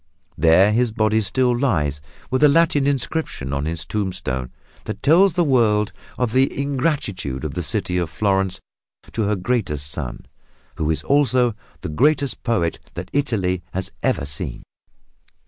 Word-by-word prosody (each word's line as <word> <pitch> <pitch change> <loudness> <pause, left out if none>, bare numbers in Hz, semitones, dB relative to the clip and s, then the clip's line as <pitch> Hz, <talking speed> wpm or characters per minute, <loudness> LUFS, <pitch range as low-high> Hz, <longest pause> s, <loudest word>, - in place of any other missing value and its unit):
There 85 +6 +5
his 120 +1 +2
body 110 0 +2
still 125 +5 +1
lies, 75 - 0 0.3
with 130 - +1
a 150 - +8
Latin 145 -2 +3
inscription 135 - -2
on 70 +1 -1
his 85 0 -3
tombstone 65 -11 -3 0.4
that 100 - -6
tells 170 +6 +5
the 175 - +2
world 110 -7 +2 0.2
of 125 -3 0
the 135 +1 +2
ingratitude 130 - -2
of - - -4
the - - -2
city 90 0 0
of 85 -2 -2
Florence 95 0 0 0.5
to 110 - -1
her 105 +1 +1
greatest 95 - -1
son, 65 -6 -5 0.5
who 75 - -1
is 80 - 0
also 130 -4 +3 0.3
the - - -5
greatest 140 - +1
poet 105 -9 0 0.2
that - - -6
Italy 100 -11 0
has 95 +1 -2
ever - - 0
seen. 70 0 -2
105 Hz, 150 wpm, -21 LUFS, 85-135 Hz, 0.5 s, a